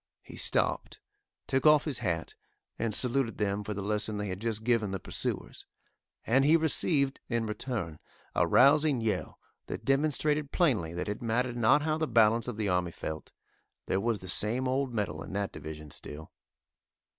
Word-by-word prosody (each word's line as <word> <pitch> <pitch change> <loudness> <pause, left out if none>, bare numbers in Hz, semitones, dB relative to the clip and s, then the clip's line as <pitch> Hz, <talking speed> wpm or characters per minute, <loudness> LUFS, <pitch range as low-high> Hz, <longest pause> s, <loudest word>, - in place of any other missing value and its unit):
He - - -12
stopped, - - -1 0.5
took 135 +3 +2
off 150 -1 +6
his 145 -6 -1
hat 80 -3 -2 0.5
and 115 -1 0
saluted 125 +2 +1
them 105 -1 -1
for 105 0 -4
the 100 - -4
lesson 105 +1 -1
they 105 -1 -3
had 95 0 -4
just 110 0 -3
given 115 -3 +1
the 95 0 -3
pursuers, - - -3 0.6
and 130 +4 +3
he 155 +4 +5
received, 145 -3 +2
in 115 -2 0
return, 105 - -4 0.3
a - - +2
rousing 145 0 +5
yell 110 -2 -2 0.3
that 110 - -6
demonstrated 145 +1 +1
plainly 110 - +1
that 90 - -3
it 105 - -4
mattered 120 +1 -1
not 120 +5 +4
how 155 0 0
the 160 - 0
balance 115 0 +3
of 120 -3 -4
the 110 -2 -1
army 90 -2 +1
felt, 80 -2 -7 0.5
there 95 - 0
was 115 -2 -1
the 95 - -9
same 115 +8 +1
old 130 0 0
mettle 100 -9 -3
in - - -8
that 100 0 -2
division 75 -1 -9
still. 75 +4 -7
115 Hz, 175 wpm, -29 LUFS, 100-135 Hz, 0.6 s, off